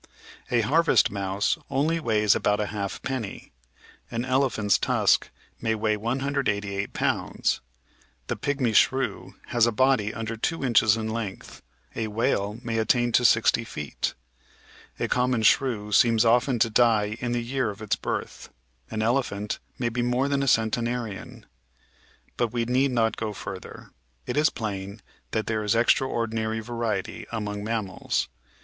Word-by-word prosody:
A 120 Hz, -1 st, +3 dB
harvest 155 Hz, +9 st, +3 dB
mouse 100 Hz, 0 st, -1 dB
only 155 Hz, +5 st, +1 dB
weighs 105 Hz, -7 st, +3 dB
about 105 Hz, 0 st, +1 dB
a 105 Hz, -, 0 dB
halfpenny, 105 Hz, +2 st, -4 dB, 0.6 s
an 120 Hz, +1 st, -3 dB
elephant's 130 Hz, -6 st, +2 dB
tusk -, -, +2 dB, 0.3 s
may 110 Hz, -1 st, +1 dB
weigh 110 Hz, 0 st, +1 dB
188 105 Hz, -4 st, -1 dB
pounds. -, -, 0 dB, 0.6 s
The -, -, -2 dB
Pigmy 140 Hz, -5 st, -1 dB
Shrew 130 Hz, +4 st, +1 dB
has 120 Hz, -1 st, +3 dB
a -, -, +2 dB
body 125 Hz, -2 st, +2 dB
under 115 Hz, 0 st, -4 dB
2 140 Hz, +6 st, -2 dB
inches 115 Hz, -3 st, +4 dB
in 110 Hz, -1 st, -3 dB
length, 110 Hz, -4 st, -5 dB, 0.3 s
a 110 Hz, -, -2 dB
whale 105 Hz, -1 st, 0 dB
may 115 Hz, -2 st, -1 dB
attain 120 Hz, +2 st, +2 dB
to 125 Hz, -, +3 dB
60 115 Hz, 0 st, +4 dB
feet. 75 Hz, -10 st, -4 dB, 0.8 s
A -, -, 0 dB
common 125 Hz, -2 st, +1 dB
shrew 110 Hz, -4 st, +2 dB
seems 115 Hz, +1 st, +4 dB
often 120 Hz, +2 st, +3 dB
to 115 Hz, 0 st, +2 dB
die 110 Hz, -3 st, +3 dB
in 120 Hz, -1 st, -2 dB
the 120 Hz, -1 st, -1 dB
year 125 Hz, -1 st, -1 dB
of 100 Hz, +1 st, -7 dB
its 105 Hz, -, +1 dB
birth; -, -, -5 dB, 0.4 s
an 110 Hz, -, -2 dB
elephant 110 Hz, -4 st, -1 dB, 0.2 s
may 120 Hz, -2 st, 0 dB
be 120 Hz, +1 st, -2 dB
more 125 Hz, +3 st, +1 dB
than 140 Hz, -1 st, 0 dB
a 140 Hz, -, -1 dB
centenarian. 115 Hz, -2 st, -1 dB, 0.9 s
But 120 Hz, -3 st, 0 dB
we 120 Hz, -1 st, -1 dB
need 130 Hz, +3 st, +2 dB
not 115 Hz, -3 st, +1 dB
go 110 Hz, -1 st, -3 dB
further; 95 Hz, -2 st, -8 dB, 0.3 s
it -, -, -3 dB
is 150 Hz, +2 st, +4 dB
plain 100 Hz, -2 st, -5 dB, 0.3 s
that 110 Hz, -, -1 dB
there 110 Hz, -1 st, -1 dB
is 105 Hz, +2 st, +1 dB
extraordinary 115 Hz, -2 st, +1 dB
variety 115 Hz, -3 st, -3 dB
among 105 Hz, -2 st, -3 dB
mammals. 105 Hz, -4 st, -2 dB
115 Hz, 145 wpm, -26 LUFS, 105-125 Hz, 0.9 s, inches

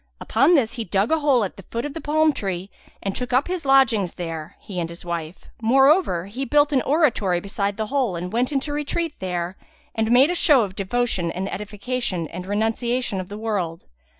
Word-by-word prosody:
Upon 275 Hz, +10 st, +3 dB
this 240 Hz, -7 st, +2 dB
he 235 Hz, -, -3 dB
dug 195 Hz, -, 0 dB
a 320 Hz, -, +3 dB
hole 280 Hz, -6 st, +3 dB
at 195 Hz, -, -5 dB
the 195 Hz, -, -10 dB
foot 235 Hz, +3 st, -3 dB
of 290 Hz, -, -5 dB
the 325 Hz, -, -6 dB
palm 310 Hz, +1 st, +2 dB
tree 195 Hz, -5 st, -4 dB, 0.3 s
and 195 Hz, -1 st, -2 dB
took 250 Hz, 0 st, -3 dB
up 260 Hz, +3 st, +3 dB
his 360 Hz, -4 st, -3 dB
lodgings 230 Hz, -9 st, +4 dB
there, 165 Hz, -3 st, -6 dB
he 185 Hz, -3 st, -6 dB
and 165 Hz, -1 st, -2 dB
his 170 Hz, +1 st, -11 dB
wife; 170 Hz, 0 st, -5 dB, 0.2 s
moreover, 270 Hz, -, +4 dB
he 230 Hz, +7 st, -5 dB
built 290 Hz, +1 st, +3 dB
an 260 Hz, -, +3 dB
oratory 240 Hz, -, +2 dB
beside 200 Hz, +1 st, -3 dB
the 220 Hz, -, -1 dB
hole 250 Hz, -5 st, 0 dB
and 180 Hz, +3 st, -5 dB
went 245 Hz, +4 st, +1 dB
into 290 Hz, +1 st, -1 dB
retreat 300 Hz, +2 st, -2 dB
there 180 Hz, -1 st, -3 dB, 0.4 s
and 220 Hz, 0 st, 0 dB
made 265 Hz, +7 st, +6 dB
a -, -, 0 dB
show 295 Hz, -8 st, +5 dB
of 190 Hz, -2 st, -5 dB
devotion 200 Hz, -3 st, -1 dB
and 185 Hz, +3 st, -3 dB
edification 210 Hz, -3 st, -3 dB
and 180 Hz, +1 st, -7 dB
renunciation 225 Hz, +1 st, -1 dB
of 185 Hz, 0 st, -6 dB
the 205 Hz, -, -6 dB
world. 195 Hz, -7 st, -3 dB
220 Hz, 205 wpm, -23 LUFS, 185-270 Hz, 0.4 s, made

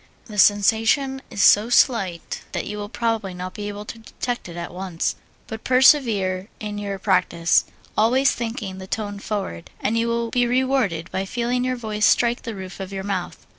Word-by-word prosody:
The 210 Hz, -3 st, -5 dB
sensation 225 Hz, +7 st, +3 dB
is 200 Hz, -, 0 dB
so 210 Hz, +3 st, +6 dB
slight 195 Hz, -9 st, +2 dB
that -, -, -2 dB
you 210 Hz, 0 st, -5 dB
will 205 Hz, 0 st, -5 dB
probably 225 Hz, -5 st, -2 dB
not 180 Hz, +1 st, -6 dB
be 205 Hz, 0 st, -5 dB
able 205 Hz, 0 st, -6 dB
to 225 Hz, -, -8 dB
detect 240 Hz, -1 st, -5 dB
it 170 Hz, -, -9 dB
at 170 Hz, 0 st, -6 dB
once, 180 Hz, -2 st, -2 dB, 0.3 s
but 220 Hz, 0 st, -7 dB
persevere 225 Hz, -8 st, +4 dB
in 210 Hz, -1 st, -5 dB
your 200 Hz, -1 st, -4 dB
practise, 170 Hz, -2 st, +2 dB, 0.3 s
always 245 Hz, +5 st, +4 dB
thinking 225 Hz, -5 st, -4 dB
the 190 Hz, -, -8 dB
tone 205 Hz, -1 st, -3 dB
forward, 195 Hz, -, -4 dB
and 215 Hz, -, 0 dB
you 230 Hz, -, +1 dB
will 235 Hz, 0 st, -1 dB
be 245 Hz, -1 st, +2 dB
rewarded 245 Hz, -10 st, 0 dB
by 190 Hz, -, -2 dB
feeling 245 Hz, +4 st, -1 dB
your 255 Hz, 0 st, 0 dB
voice 215 Hz, -3 st, 0 dB
strike 240 Hz, 0 st, +3 dB
the 230 Hz, -3 st, -6 dB
roof 190 Hz, -1 st, -8 dB
of 190 Hz, 0 st, -6 dB
your 195 Hz, -1 st, -4 dB
mouth. 195 Hz, -3 st, -4 dB
210 Hz, 185 wpm, -23 LUFS, 190-235 Hz, 0.3 s, so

